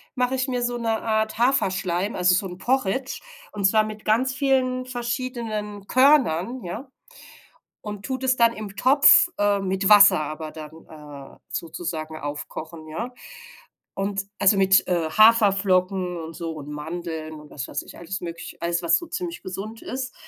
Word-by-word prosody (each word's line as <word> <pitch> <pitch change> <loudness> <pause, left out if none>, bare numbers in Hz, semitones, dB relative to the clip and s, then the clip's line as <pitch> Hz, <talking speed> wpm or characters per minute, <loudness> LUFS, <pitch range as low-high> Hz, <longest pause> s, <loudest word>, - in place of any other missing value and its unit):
mache 250 0 0
ich 260 0 0
mir 250 -1 -2
so 240 0 -1
'ne 230 - -2
Art 220 -1 -1
Haferschleim, 195 -6 0
also 180 0 +3
so 190 +2 +1
'n 180 0 -9
Porridge 260 +2 -1 0.3
und 200 - -3
zwar 215 +2 +4
mit 215 0 -8
ganz 250 +5 +2
vielen 255 -2 0
verschiedenen 235 -5 -4
Körnern, 255 - +3
ja. 215 +10 -7 0.9
Und 210 -1 -8
tue 260 -1 -3
das 260 -1 +1
dann 230 -1 +4
im 210 -3 -8
Topf, 280 - +7
äh, 205 -1 +2
mit 190 0 -1
Wasser 205 -6 +8
aber 155 +1 -5
dann, 160 +1 -10
äh, 145 -3 -12
sozusagen 160 -1 -5
aufkochen, 155 +2 -7
ja? 225 +11 -5 0.9
Und 195 0 -2
also 195 0 +4
mit, 190 0 +4
äh, 170 -3 0
Haferflocken 195 -4 +3
und 165 0 -8
so 165 -1 -5
und 150 -2 -9
Mandeln 160 +1 -6
und 150 - -14
was 130 - -6
weiß - - -3
ich, - - -13
alles 190 +2 -5
möglich 170 -1 -8
alles, 170 +1 -1
was 170 - +3
so 345 - -9
ziemlich 345 +1 -5
gesund 210 +4 -7
ist. 260 0 -5
200 Hz, 165 wpm, -23 LUFS, 170-245 Hz, 0.9 s, Wasser